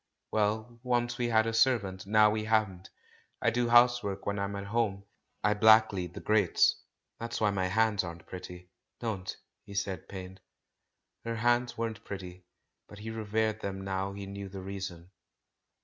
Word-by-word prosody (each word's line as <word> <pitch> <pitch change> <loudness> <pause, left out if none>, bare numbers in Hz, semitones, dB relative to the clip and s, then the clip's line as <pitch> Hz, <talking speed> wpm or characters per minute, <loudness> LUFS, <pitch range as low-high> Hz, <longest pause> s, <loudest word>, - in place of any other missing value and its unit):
Well, 110 +2 0
once 120 -1 0
we 120 - +1
had 110 -1 +3
a 115 - -1
servant. 105 -6 +2
Now 105 0 +5
we 110 0 -2
haven't. 105 -4 0 0.5
I 115 - +2
do 120 0 0
housework 120 -4 +4
when 100 0 -1
I'm 100 0 -2
at 100 - -4
home 100 -2 -1 0.2
— - - -46
I 105 +1 +4
blacklead 105 -5 +4
the - - -5
grates. 105 -4 +3 0.4
That's 115 0 -4
why 105 -2 +3
my 95 -2 0
hands 105 +1 +2
aren't 85 -1 -8
pretty." 90 0 -9 0.3
"Don't," 100 -5 -4 0.3
he 100 - -11
said, 95 -4 -3
pained. 95 0 -8 0.8
Her 115 0 -3
hands 120 +2 +1
weren't 115 -3 -3
pretty, 90 -2 -8 0.4
but 105 - -12
he 110 +2 -6
revered 110 0 -1
them 95 -1 -4
now 95 0 -2
he 100 0 -6
knew 100 0 -7
the 95 0 -8
reason. 95 -2 -6
105 Hz, 165 wpm, -30 LUFS, 95-110 Hz, 0.8 s, Now